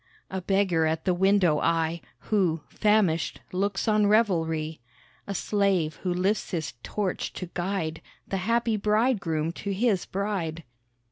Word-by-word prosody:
A 190 0 -3
beggar 185 -4 +2
at 160 0 -2
the 185 - +3
window 185 -4 +3
I, 165 0 +1 0.3
Who, 180 -7 +2
famished, 210 -7 +2
looks 195 +2 -1
on 210 -1 +4
revelry; 165 - +1 0.5
A 200 - -3
slave 190 -7 +1
who 185 - -2
lifts 190 +4 0
his 160 -6 -3
torch 200 - -2
to 180 -2 -7
guide 175 -3 -2 0.3
The 195 - -2
happy 230 +3 +1
bridegroom 205 -7 +1
to 200 +3 -5
his 200 -1 +1
bride. 185 -5 -2
190 Hz, 135 wpm, -27 LUFS, 165-205 Hz, 0.5 s, on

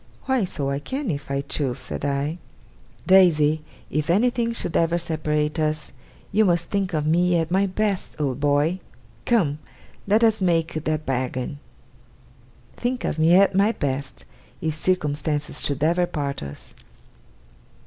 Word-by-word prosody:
'Why 260 -6 +1
so 140 -6 -2
I 140 - -1
can, 260 - -3
if 145 -2 -5
I 140 0 0
choose,' 140 -2 -2
said 125 0 -5
I. 145 +4 -1 0.7
'Daisy, 160 -5 +5 0.3
if 150 +1 -1
anything 235 +5 +2
should 200 -8 -2
ever 165 +1 +2
separate 155 -2 -1
us, 155 -1 -1 0.4
you 215 +2 +4
must 175 -3 +1
think 195 -3 -1
of 150 -1 0
me 175 +2 +3
at 165 0 -1
my 195 +2 +3
best, 195 -2 -2
old 135 -3 -1
boy. 145 +5 +2 0.5
Come! 160 -11 +2 0.5
Let 215 +3 +3
us 220 -2 +3
make 165 -3 0
that 155 0 -1
bargain. 130 +1 -2 1.2
Think 250 +1 -2
of 160 - -2
me 165 +2 +5
at 195 +1 +5
my 200 +4 +3
best, 140 -4 -4 0.3
if 160 -1 -1
circumstances 150 -3 -1
should 140 0 -1
ever 175 +2 +2
part 140 -4 -3
us! 70 0 -9
160 Hz, 150 wpm, -23 LUFS, 145-185 Hz, 1.2 s, Daisy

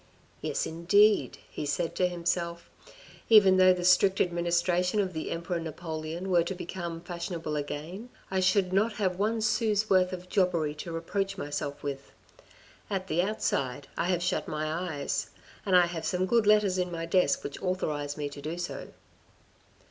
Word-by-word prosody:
" - - -33
Yes, - - -1
indeed," 200 +6 +3
he - - -5
said 150 +3 -1
to 180 - +2
himself, 170 -1 -2 0.3
" - - -21
even 200 -4 +7
though 185 0 +7
the 180 -1 -1
strict 190 +1 +5
administration 175 +2 +1
of 190 -3 0
the 160 - -4
Emperor 170 +1 -3
Napoleon 165 +2 -5
were 175 -1 +5
to 185 +3 -4
become 170 -2 -5
fashionable 170 -2 -4
again, 155 +10 -5 0.2
I 190 - +1
should 185 0 +2
not 210 +3 +2
have 185 -3 -1
one 220 +2 +1
sou's 215 -1 +1
worth 185 -1 +4
of 180 -1 -7
jobbery 175 -6 +1
to 155 +3 -7
reproach 195 +4 -2
myself 145 -4 -4
with; 140 -1 -5 0.8
at 190 -2 -3
the 165 +3 +2
outside, 140 -9 -2
I 170 - -1
have 175 -1 0
shut 180 +1 -1
my 155 0 -2
eyes, 160 -4 -3 0.4
and 190 - +4
I 175 - +6
have 170 -2 -5
some 180 0 0
good 225 +1 +2
letters 210 -3 +4
in 180 -1 -1
my 165 -1 -3
desk 170 -3 +2
which 140 - -6
authorise 150 -6 -2
me 145 -1 -2
to 145 0 -10
do 160 +4 -4
so. 175 0 -5
175 Hz, 175 wpm, -29 LUFS, 165-190 Hz, 0.8 s, even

